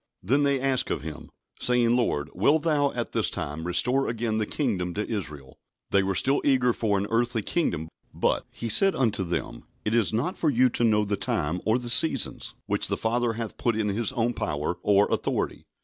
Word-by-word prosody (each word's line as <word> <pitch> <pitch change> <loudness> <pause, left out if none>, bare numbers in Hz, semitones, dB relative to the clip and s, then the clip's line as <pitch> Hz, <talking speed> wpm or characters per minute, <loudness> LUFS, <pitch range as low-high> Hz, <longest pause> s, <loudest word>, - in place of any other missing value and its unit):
Then 130 +10 +2
"they 140 -1 +2
asked 135 -1 0
of - - -2
Him, 75 -2 -8 0.3
saying, 120 -1 +2
Lord, 80 -11 -1
wilt 145 - +2
Thou 145 -4 +2
at 120 -1 -4
this - - +1
time 75 +4 -4
restore 125 +10 +2
again 115 -1 -1
the 105 - -1
kingdom 95 - -2
to 105 - -2
Israel?" 75 - -6 0.3
They 100 - +4
were 95 0 -1
still 135 +1 +2
eager 125 -3 +3
for 105 -3 0
an 100 - -1
earthly 115 -1 0
kingdom. 85 - -1 0.2
But - - -1
"He 115 - -6
said 195 - +5
unto 110 -7 0
them, 85 -1 -4 0.2
It 105 - 0
is 115 -4 +3
not 125 +12 -2
for 160 - +2
you 130 -1 +3
to 120 - -1
know 105 -2 +3
the 100 0 -1
time 80 +1 -1
or 110 +2 +3
the 120 -1 -4
seasons, 135 0 +2
which - - 0
the - - -1
Father 120 +1 0
hath 115 -1 -6
put 120 -2 +1
in 110 -1 0
His 110 +4 0
own 120 -1 0
power," 75 0 -3
or 100 0 +3
authority. - - -2
115 Hz, 205 wpm, -26 LUFS, 100-125 Hz, 0.3 s, said